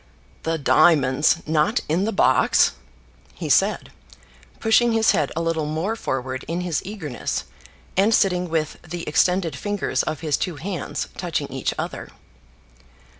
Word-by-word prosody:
"The 165 0 -1
diamonds 150 +1 +3
not 160 +9 +1
in 170 +6 +1
the 220 - 0
box!" 130 -10 +4 0.6
he - - -5
said, - - +2 0.7
pushing 230 +1 +3
his 225 0 +4
head 150 -3 0
a 165 - -1
little 165 -2 -1
more 165 +9 -2
forward 130 - -3
in 170 +2 -2
his 175 -4 -1
eagerness, 170 - -4 0.5
and 200 +4 +3
sitting 180 -5 +2
with 160 -2 -2
the 175 0 -7
extended 175 +2 +2
fingers 205 -10 -1
of 155 - -4
his 155 -4 0
two 180 - -3
hands 175 +5 -4
touching - - -2
each - - -2
other. - - -5
165 Hz, 140 wpm, -23 LUFS, 150-195 Hz, 0.7 s, box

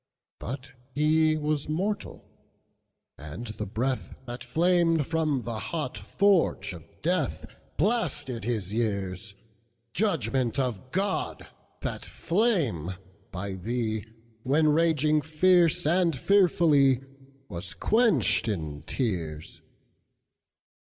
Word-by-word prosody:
But 130 +2 -6 0.2
he 155 +1 +3
was 150 -1 -1
mortal; 195 +6 -2 0.9
and 80 +11 -7
the 110 -2 -5
breathThat 125 +2 -4
flamed 170 -2 +2
from 155 -5 0
the 115 -2 -4
hot 150 -4 -3
forge 175 - +2
of 80 -2 -12
DeathBlasted 150 - -1
his 105 -4 -2
years; 100 -2 -2 0.6
Judgment 135 - 0
of 130 -2 -2
God! 195 +1 -1 0.4
that - - -4
flame 165 - 0 0.4
by 95 +1 -4
thee, 110 +2 -2 0.4
When 150 +5 +3
raging 155 -1 +3
fierce 165 +2 +3
and 170 -1 +2
fearfully, 150 -8 +4 0.4
Was 90 -1 -6
quenched 140 - +3
in 80 -8 -3
tears! 85 - -3
135 Hz, 90 wpm, -27 LUFS, 110-165 Hz, 0.9 s, fearfully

